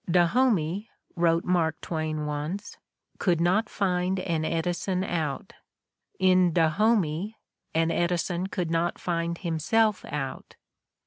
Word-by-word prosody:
"Dahomey," 185 Hz, +1 st, +2 dB, 0.3 s
wrote 170 Hz, -1 st, +2 dB
Mark 165 Hz, -3 st, +1 dB
Twain 155 Hz, -2 st, -3 dB
once, 150 Hz, +7 st, -4 dB, 0.4 s
"could 175 Hz, -4 st, +2 dB
not 190 Hz, +6 st, +2 dB
find 185 Hz, -1 st, 0 dB
an 165 Hz, -4 st, -1 dB
Edison 175 Hz, +3 st, -1 dB
out; 160 Hz, -7 st, -3 dB, 0.6 s
in 185 Hz, -1 st, +4 dB
Dahomey 185 Hz, +2 st, +2 dB, 0.4 s
an 165 Hz, 0 st, +2 dB
Edison 175 Hz, +1 st, 0 dB
could 180 Hz, -4 st, -3 dB
not 170 Hz, +1 st, 0 dB
find 170 Hz, -1 st, -2 dB
himself 190 Hz, +5 st, +1 dB
out. 135 Hz, -3 st, -5 dB
175 Hz, 110 wpm, -27 LUFS, 165-185 Hz, 0.6 s, in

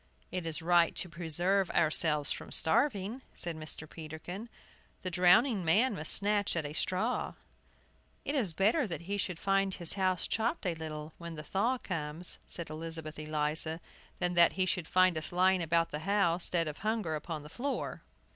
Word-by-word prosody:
"It 180 Hz, -2 st, -4 dB
is 165 Hz, 0 st, -3 dB
right 170 Hz, -1 st, +3 dB
to -, -, -1 dB
preserve 175 Hz, +3 st, 0 dB
ourselves 155 Hz, -2 st, +3 dB
from -, -, -6 dB
starving," 215 Hz, -, +1 dB
said 170 Hz, -1 st, -4 dB
Mr. 155 Hz, 0 st, -6 dB
Peterkin. 165 Hz, +8 st, -8 dB, 0.5 s
"The 185 Hz, -, -3 dB
drowning 185 Hz, +5 st, +4 dB
man 210 Hz, +10 st, +3 dB
must 155 Hz, -5 st, 0 dB
snatch 205 Hz, -1 st, +5 dB
at 160 Hz, -3 st, -2 dB
a 145 Hz, -, -5 dB
straw!" 185 Hz, +9 st, -1 dB, 0.9 s
"It 280 Hz, -, -2 dB
is 240 Hz, -, +2 dB
better 215 Hz, -, +2 dB
that 170 Hz, -4 st, -5 dB
he 200 Hz, +4 st, -3 dB
should 185 Hz, -3 st, -2 dB
find 195 Hz, +1 st, +1 dB
his 170 Hz, -2 st, -1 dB
house 185 Hz, -2 st, +1 dB
chopped 230 Hz, +4 st, -1 dB
a 180 Hz, -, 0 dB
little 155 Hz, -1 st, -7 dB
when 170 Hz, -1 st, -7 dB
the 150 Hz, -, -7 dB
thaw 225 Hz, +10 st, 0 dB
comes," 165 Hz, -4 st, 0 dB
said 170 Hz, -3 st, -3 dB
Elizabeth 160 Hz, -1 st, -5 dB
Eliza, 155 Hz, +1 st, 0 dB, 0.4 s
"than 180 Hz, -1 st, -1 dB
that 170 Hz, -1 st, +5 dB
he 185 Hz, -1 st, 0 dB
should 175 Hz, -2 st, -2 dB
find 185 Hz, -3 st, +3 dB
us 155 Hz, -, -6 dB
lying 185 Hz, +1 st, +3 dB
about 165 Hz, 0 st, +1 dB
the 150 Hz, -, -4 dB
house, 185 Hz, -1 st, +1 dB
dead 170 Hz, -2 st, 0 dB
of 150 Hz, -, -6 dB
hunger, 215 Hz, -5 st, -1 dB
upon 155 Hz, 0 st, -5 dB
the -, -, -10 dB
floor." 260 Hz, -, -4 dB
175 Hz, 175 wpm, -31 LUFS, 160-195 Hz, 0.9 s, snatch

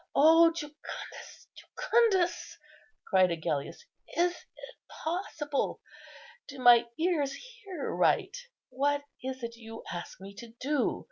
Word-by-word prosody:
O 325 Hz, +3 st, +7 dB
Jucundus, 300 Hz, -3 st, -9 dB
Jucundus!" 400 Hz, -7 st, +1 dB, 0.5 s
cried 185 Hz, -1 st, +4 dB
Agellius, 160 Hz, -, -3 dB, 0.3 s
"is 350 Hz, +1 st, +4 dB
it -, -, -14 dB
possible? 315 Hz, -4 st, -3 dB, 0.7 s
do 275 Hz, -, -9 dB
my 240 Hz, -2 st, +7 dB
ears 315 Hz, -5 st, +1 dB
hear 395 Hz, -, -7 dB
right? -, -, +2 dB, 0.3 s
What 285 Hz, +2 st, 0 dB, 0.2 s
is 260 Hz, -1 st, -5 dB
it 235 Hz, 0 st, -5 dB
you 225 Hz, -1 st, -10 dB
ask 175 Hz, 0 st, -7 dB
me 195 Hz, +1 st, -10 dB
to 235 Hz, -1 st, -11 dB
do?" 285 Hz, 0 st, 0 dB
290 Hz, 115 wpm, -30 LUFS, 235-345 Hz, 0.7 s, O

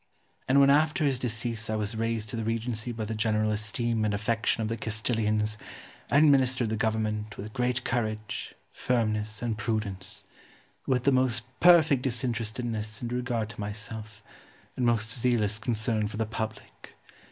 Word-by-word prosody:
And 135 Hz, +2 st, +5 dB
when 140 Hz, 0 st, +7 dB
after 150 Hz, +2 st, +3 dB
his 135 Hz, -3 st, +1 dB
decease 115 Hz, -2 st, -2 dB
I 110 Hz, -, 0 dB
was 105 Hz, +1 st, -2 dB
raised 115 Hz, -1 st, -1 dB
to -, -, -5 dB
the 115 Hz, -, -2 dB
regency 115 Hz, +1 st, -2 dB
by 110 Hz, -2 st, -4 dB
the 110 Hz, -, -3 dB
general 110 Hz, 0 st, +1 dB
esteem 110 Hz, +2 st, -1 dB
and 105 Hz, -1 st, +1 dB
affection 115 Hz, +2 st, 0 dB
of -, -, -1 dB
the 115 Hz, -, -1 dB
Castilians, 110 Hz, -1 st, 0 dB, 0.5 s
I -, -, +4 dB
administered 130 Hz, -6 st, +4 dB
the -, -, +1 dB
government 110 Hz, -1 st, -1 dB
with 110 Hz, +2 st, -7 dB
great 125 Hz, 0 st, 0 dB
courage, 110 Hz, -3 st, -3 dB, 0.2 s
firmness, 110 Hz, -3 st, -1 dB
and 115 Hz, -2 st, -1 dB
prudence; 105 Hz, -5 st, -2 dB, 0.6 s
with 125 Hz, -2 st, +2 dB
the 140 Hz, -, +4 dB
most 130 Hz, -4 st, +2 dB, 0.2 s
perfect 160 Hz, -6 st, +6 dB
disinterestedness 115 Hz, -3 st, -3 dB
in 120 Hz, -, -2 dB
regard 120 Hz, -3 st, -1 dB
to 115 Hz, -, -11 dB
myself, 105 Hz, 0 st, -6 dB, 0.5 s
and 125 Hz, -, +1 dB
most 115 Hz, -2 st, +1 dB
zealous 115 Hz, -4 st, +1 dB
concern 110 Hz, -2 st, 0 dB
for 105 Hz, -, -7 dB
the 110 Hz, -, 0 dB
public. 110 Hz, 0 st, -6 dB
110 Hz, 160 wpm, -28 LUFS, 110-125 Hz, 0.6 s, when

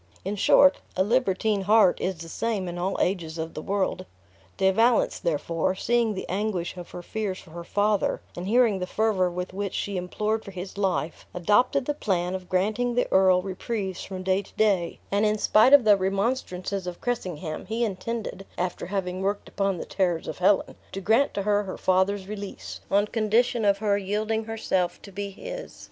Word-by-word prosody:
In 200 Hz, +2 st, -2 dB
short, 280 Hz, +7 st, +5 dB, 0.2 s
a 185 Hz, -, +4 dB
libertine 215 Hz, -2 st, +1 dB
heart 205 Hz, -1 st, +4 dB
is 190 Hz, 0 st, -1 dB
the 165 Hz, 0 st, -8 dB
same 210 Hz, +1 st, -2 dB
in 175 Hz, 0 st, -5 dB
all 190 Hz, +2 st, -1 dB
ages 170 Hz, -3 st, -1 dB
of 160 Hz, 0 st, -4 dB
the 155 Hz, -, -5 dB
world. 190 Hz, 0 st, -1 dB, 0.5 s
De 190 Hz, 0 st, +4 dB
Valence, 230 Hz, +4 st, +3 dB
therefore, 165 Hz, +3 st, -1 dB
seeing 235 Hz, +1 st, +1 dB
the 190 Hz, -, -5 dB
anguish 190 Hz, -3 st, -2 dB
of 175 Hz, -1 st, -9 dB
her 175 Hz, -, -8 dB
fears 205 Hz, -1 st, -3 dB
for 165 Hz, -, -14 dB
her 170 Hz, +1 st, -7 dB
father, 205 Hz, +3 st, +1 dB, 0.2 s
and 175 Hz, +2 st, -5 dB
hearing 225 Hz, -3 st, +3 dB
the 180 Hz, -, -3 dB
fervor 205 Hz, -3 st, +1 dB
with 180 Hz, +1 st, -5 dB
which 200 Hz, 0 st, -3 dB
she 200 Hz, -2 st, -2 dB
implored 215 Hz, +5 st, -2 dB
for -, -, -9 dB
his 185 Hz, 0 st, -7 dB
life, 185 Hz, -5 st, -2 dB
adopted 245 Hz, +9 st, +2 dB
the 295 Hz, -, 0 dB
plan 185 Hz, -9 st, -1 dB
of 185 Hz, -1 st, -6 dB
granting 215 Hz, +6 st, 0 dB
the 245 Hz, -, +2 dB
earl 185 Hz, -1 st, +5 dB
reprieves 190 Hz, 0 st, -4 dB
from 185 Hz, -1 st, -6 dB
day 190 Hz, +1 st, +2 dB
to 200 Hz, -, -18 dB
day; 195 Hz, -6 st, +1 dB
and 200 Hz, +1 st, +2 dB
in 215 Hz, 0 st, +2 dB
spite 215 Hz, +4 st, +5 dB
of 285 Hz, -3 st, +8 dB
the 210 Hz, -2 st, +6 dB
remonstrances 195 Hz, -1 st, -2 dB
of 175 Hz, -1 st, -5 dB
Cressingham, 180 Hz, -10 st, -4 dB
he 230 Hz, +2 st, 0 dB
intended 215 Hz, 0 st, -4 dB
(after 180 Hz, -1 st, -3 dB
having 185 Hz, -1 st, -3 dB
worked 200 Hz, +1 st, -1 dB
upon 195 Hz, -2 st, -1 dB
the -, -, -5 dB
terrors 175 Hz, -4 st, -1 dB
of -, -, -5 dB
Helen), 190 Hz, +2 st, +3 dB, 0.2 s
to 195 Hz, -, -3 dB
grant 225 Hz, +8 st, +2 dB
to 200 Hz, -, -1 dB
her 205 Hz, 0 st, +2 dB
her 195 Hz, -2 st, -6 dB
father's 190 Hz, +1 st, +1 dB
release, 205 Hz, -1 st, -7 dB
on 205 Hz, +1 st, +3 dB
condition 225 Hz, +2 st, +1 dB
of 200 Hz, -1 st, +4 dB
her 205 Hz, -1 st, +1 dB
yielding 215 Hz, +3 st, -1 dB
herself 190 Hz, -5 st, -1 dB
to 200 Hz, -, -11 dB
be 200 Hz, +1 st, -4 dB
his. -, -, -8 dB
195 Hz, 190 wpm, -26 LUFS, 185-215 Hz, 0.5 s, of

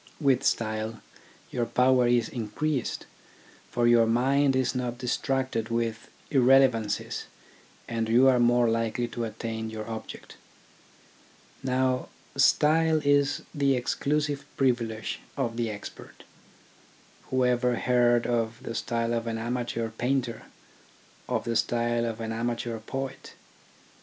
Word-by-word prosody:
With 135 Hz, -4 st, +3 dB
style 110 Hz, 0 st, -1 dB, 0.5 s
your 120 Hz, -2 st, -1 dB
power 125 Hz, +1 st, +3 dB
is 120 Hz, -2 st, +2 dB
increased, 125 Hz, +5 st, -3 dB, 0.6 s
for 120 Hz, -1 st, 0 dB
your 120 Hz, -1 st, +5 dB
mind 135 Hz, +4 st, +3 dB
is 130 Hz, -1 st, +1 dB
not 125 Hz, -2 st, -3 dB
distracted 125 Hz, -2 st, -1 dB
with 115 Hz, -1 st, -2 dB, 0.2 s
irrelevancies, 130 Hz, -5 st, +3 dB, 0.6 s
and 115 Hz, -1 st, -2 dB
you 125 Hz, +4 st, +5 dB
are 130 Hz, -2 st, +5 dB
more 120 Hz, 0 st, +4 dB
likely 115 Hz, +1 st, 0 dB
to 120 Hz, 0 st, -3 dB
attain 110 Hz, 0 st, -5 dB
your 110 Hz, 0 st, -6 dB
object. 110 Hz, -1 st, -8 dB, 1.2 s
Now 130 Hz, 0 st, 0 dB, 0.3 s
style 160 Hz, +1 st, +4 dB
is 145 Hz, 0 st, +2 dB
the 140 Hz, -2 st, +2 dB
exclusive 145 Hz, +3 st, -1 dB
privilege 115 Hz, -4 st, 0 dB, 0.2 s
of 120 Hz, -4 st, -1 dB
the 115 Hz, -1 st, -1 dB
expert. 105 Hz, -1 st, -9 dB, 1.1 s
Whoever 125 Hz, -1 st, +2 dB
heard 120 Hz, -1 st, +3 dB
of 115 Hz, -1 st, 0 dB
the 115 Hz, -, -5 dB
style 115 Hz, 0 st, -1 dB
of 115 Hz, 0 st, -2 dB
an 115 Hz, -1 st, -2 dB
amateur 120 Hz, 0 st, -2 dB
painter, 125 Hz, +1 st, -2 dB, 0.8 s
of -, -, 0 dB
the 115 Hz, -, -2 dB
style 120 Hz, +1 st, +1 dB
of 115 Hz, -1 st, -4 dB
an 110 Hz, -1 st, -4 dB
amateur 115 Hz, 0 st, -2 dB
poet 135 Hz, +4 st, -6 dB
120 Hz, 120 wpm, -27 LUFS, 115-130 Hz, 1.2 s, your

